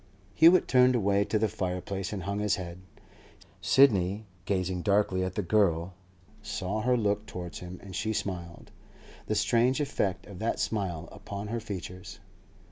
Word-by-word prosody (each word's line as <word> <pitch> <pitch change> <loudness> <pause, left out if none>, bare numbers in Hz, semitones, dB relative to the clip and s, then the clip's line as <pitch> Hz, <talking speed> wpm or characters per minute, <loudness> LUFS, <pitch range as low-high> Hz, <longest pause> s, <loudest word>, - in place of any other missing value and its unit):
Hewett 170 - +6
turned 125 0 +5
away 100 -3 +2
to 110 - 0
the 110 +1 +2
fireplace 95 0 -3
and 100 -4 -4
hung 100 +2 -2
his 105 0 +2
head. 90 -2 -7 0.8
Sidney, 105 -6 +4 0.2
gazing 90 -2 -1
darkly 100 -1 +2
at 95 0 -3
the 105 - -1
girl, 90 -2 +2 0.5
saw 100 +4 -3
her 125 +2 +2
look 105 -1 0
towards 90 -3 -6
him, 90 0 -8
and 95 -2 -9
she 110 - -1
smiled. 85 -5 -5 0.6
The - - 0
strange 125 +3 +2
effect 105 -10 -1
of 100 -3 -10
that 110 +1 -1
smile 90 -6 -2
upon 100 +1 -7
her 115 +1 -2
features! 95 -4 -7
100 Hz, 155 wpm, -29 LUFS, 90-110 Hz, 0.8 s, Hewett